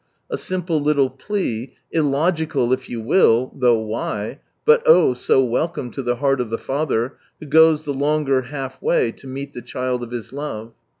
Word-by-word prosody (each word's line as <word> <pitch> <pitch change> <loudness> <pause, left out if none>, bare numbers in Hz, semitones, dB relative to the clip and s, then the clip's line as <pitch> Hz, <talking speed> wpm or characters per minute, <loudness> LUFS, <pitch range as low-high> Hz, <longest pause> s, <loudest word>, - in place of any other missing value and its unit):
A 455 - -1
simple 175 -4 -1
little 145 -3 +2
plea, 130 - -3 0.2
"illogical" 155 -3 +1
if 130 0 -3
you 120 - -4
will 120 -1 +3
(though 125 -3 +3
why 110 +2 -4
?), - - -49
but 465 +1 +6
oh 480 - +7
i - - -1
so 125 +1 +2
welcome 125 +1 -2
to 135 - -5
the 120 -1 0
heart 135 0 +1
of 120 - -4
the 115 - -2
Father, 135 -3 -2 0.2
who - - -9
goes 155 +1 +5
the 145 - -2
longer 140 -1 +1
half 135 0 -7
way 475 -1 +2
to 135 - -14
meet 135 +2 -6
the 120 - -7
child 125 +1 -3
of 120 - -6
His 120 0 -6
love. 115 -6 -6
135 Hz, 190 wpm, -21 LUFS, 125-155 Hz, 0.2 s, oh